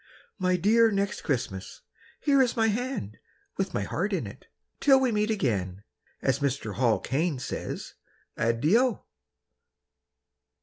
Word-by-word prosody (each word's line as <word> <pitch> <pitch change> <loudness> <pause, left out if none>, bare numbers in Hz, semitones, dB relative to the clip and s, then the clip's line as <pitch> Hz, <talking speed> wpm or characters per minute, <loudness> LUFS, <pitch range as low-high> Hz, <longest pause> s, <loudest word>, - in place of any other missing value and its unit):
My 185 -1 +2
dear 225 +6 +4
Next 200 -2 -1
Christmas, 110 -8 -3 0.4
Here 280 -2 +4
is 250 -2 +1
my 225 0 +3
hand, 225 - -3 0.4
With - - -2
my - - 0
heart - - -2
in - - -1
it. - - -11 0.3
Till 270 -2 +6
we 260 -2 +2
meet 210 0 +1
again 100 - -1 0.4
As 135 0 +2
Mr. 135 -6 -2
Hall 115 -4 +2
Caine 150 - -1
says 125 - -5 0.4
Addio. 165 - +2
180 Hz, 130 wpm, -27 LUFS, -, 0.4 s, Till